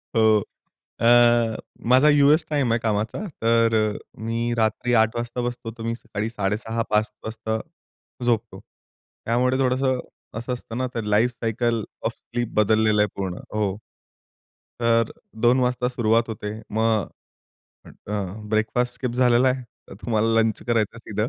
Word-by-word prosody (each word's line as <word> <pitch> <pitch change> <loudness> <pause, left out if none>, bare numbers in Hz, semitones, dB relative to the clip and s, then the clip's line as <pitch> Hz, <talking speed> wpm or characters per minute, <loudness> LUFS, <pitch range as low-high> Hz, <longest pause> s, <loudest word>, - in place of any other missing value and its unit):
हो. 110 -2 +4 0.6
अ, 120 -1 +5 0.3
माझा 130 +4 +6
US 145 +2 +5
time 140 -6 +1
आहे 115 - +2
कामाचा. 110 - -1 0.2
तर 115 0 +3 0.2
अ, - - -6 0.2
मी 115 +1 -1
रात्री 115 +2 0
8:00 110 +1 -1
वाजता 120 +1 -3
बसतो, 120 -1 -4
तर - - -6
मी 115 0 -1
सकाळी 110 -2 -5
6:30, 110 +2 -2
5:00 105 0 +2
वाजता 110 0 -3 0.7
झोपतो. 120 -3 -1 0.6
त्यामुळे 125 +3 +1
थोडंसं 130 0 +1 0.4
असं 120 +2 -4
असतं 120 -2 -6
ना, 130 - 0
तर 115 - -2
लाईफसायकल 115 +1 0 0.2
ओफ - - 0
स्लीप 120 -1 -4
बदललेलं 110 0 +3
आहे 105 - +1
पूर्ण. 95 -2 -3 0.2
हो. 100 -3 0 1.0
तर 115 -1 +2 0.3
2:00 125 +2 +5
वाजता 125 0 +1
सुरुवात 115 -1 +2
होते. 105 0 -5
मग 110 -2 +1 0.8
अ, 105 - -11 0.4
ब्रेकफास्ट 115 +3 +1
स्किप 125 - -3
झालेला 125 0 +4
आहे. 130 0 -1 0.3
तर - - -10
तुम्हाला 110 -1 +1
लंच 110 -1 0
करायचं 115 -1 0
सीधं. 105 0 -3
115 Hz, 140 wpm, -23 LUFS, 110-120 Hz, 1.0 s, माझा